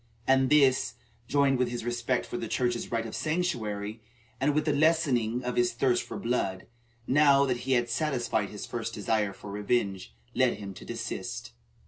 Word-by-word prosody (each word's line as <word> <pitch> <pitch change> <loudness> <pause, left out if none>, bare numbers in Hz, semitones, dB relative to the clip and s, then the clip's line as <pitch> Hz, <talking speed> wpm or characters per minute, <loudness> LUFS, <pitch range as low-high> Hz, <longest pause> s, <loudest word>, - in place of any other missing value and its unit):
And 130 0 +4
this, 135 -3 +4 0.3
joined 140 -2 +3
with 125 -1 +2
his 120 -1 -4
respect 120 +1 0
for - - -7
the 115 - -3
Church's 120 0 -1
right 115 -1 0
of 110 - -7
sanctuary, 115 -11 -2 0.4
and 145 +2 +2
with 150 0 +1
the 150 - +2
lessening 140 -7 +2
of 125 0 -3
his 120 0 +3
thirst 120 0 +2
for - - -7
blood, 100 -6 -1 0.4
now 140 0 +5
that 125 -2 0
he 135 - +3
had 120 -1 +2
satisfied 120 -5 0
his 105 - -7
first 115 -1 -4
desire 105 -1 0
for 100 +1 -10
revenge, 100 - -1 0.2
led 130 -1 +3
him 100 -2 -7
to - - -11
desist. - - -5
120 Hz, 175 wpm, -28 LUFS, 110-135 Hz, 0.4 s, now